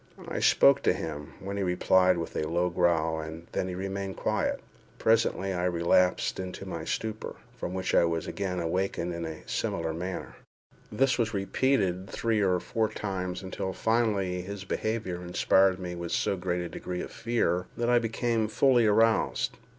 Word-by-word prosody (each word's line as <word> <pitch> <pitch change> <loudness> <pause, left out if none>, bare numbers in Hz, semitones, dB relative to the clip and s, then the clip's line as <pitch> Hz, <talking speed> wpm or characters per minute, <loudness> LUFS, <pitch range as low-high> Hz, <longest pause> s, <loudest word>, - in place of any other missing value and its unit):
I - - -3
spoke 70 - +5
to - - +3
him, 75 +1 -6
when 100 +1 -5
he - - -1
replied 90 0 +3
with 85 - -5
a 75 - -1
low 85 +2 +1
growl, 80 -2 +2
and 80 +1 -7
then 90 - -1
remained 95 0 -4
quiet. - - 0 0.4
Presently 110 -4 +2
I 90 0 -1
relapsed 90 +1 +2
into 95 +1 -6
my 85 -4 -5
stupor, 110 +4 -3 0.2
from 90 - -5
which 95 0 -2
I - - +5
was 80 -1 -1
again 95 -2 -3
awakened 90 0 -1
in 85 0 -4
a 80 -1 -8
similar 80 -1 -2
manner. 90 +3 -5 0.5
This 135 -1 +2
was 115 -2 0
repeated 100 -3 +1
three 115 -2 0
or 90 -2 +2
four 110 +4 -1
times, 95 -2 -4
until 95 0 -4
finally 100 -3 +1
his 100 +1 -6
behaviour 105 -3 -2
inspired 95 +1 +3
me 90 -1 -5
with 85 -1 -5
so - - +1
great 90 -1 -2
a 85 - -4
degree 90 +2 -5
of - - -7
fear, 110 -6 0
that 120 +1 +1
I 120 - +5
became 115 -1 0
fully 120 +1 +4
aroused. 110 +2 +2
95 Hz, 170 wpm, -28 LUFS, 90-105 Hz, 0.5 s, spoke